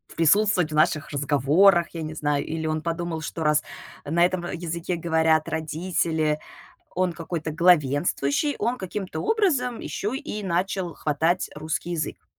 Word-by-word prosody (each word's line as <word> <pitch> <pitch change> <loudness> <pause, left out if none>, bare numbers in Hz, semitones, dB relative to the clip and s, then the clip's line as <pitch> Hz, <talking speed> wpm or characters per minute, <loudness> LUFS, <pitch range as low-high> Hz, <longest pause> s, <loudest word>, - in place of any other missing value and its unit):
присутствовать 180 0 +3
в - - -3
наших 155 0 +2
разговорах, 150 +6 +3
я 165 - -5
не 155 0 -5
знаю. 145 -2 -1
Или 160 0 -4
он 155 0 -1
подумал, 165 -1 -3
что, 165 0 -4
раз 150 0 +3 0.4
на 170 +4 +3
этом 180 0 -1
в 175 - -5
языке 170 +1 -3
говорят 160 -1 +2
родители, 160 -1 -1 0.5
он 185 0 +1
какой-то 165 -1 -4
главенствующий, 155 - +2
он 240 +4 -1
каким-то 190 0 -5
образом 330 - +1
еще 215 +6 -3
и 210 -5 -5
начал 180 0 -1
хватать 160 +4 0
русский 155 +3 -3
язык. 160 -3 -4
165 Hz, 145 wpm, -25 LUFS, 155-185 Hz, 0.5 s, присутствовать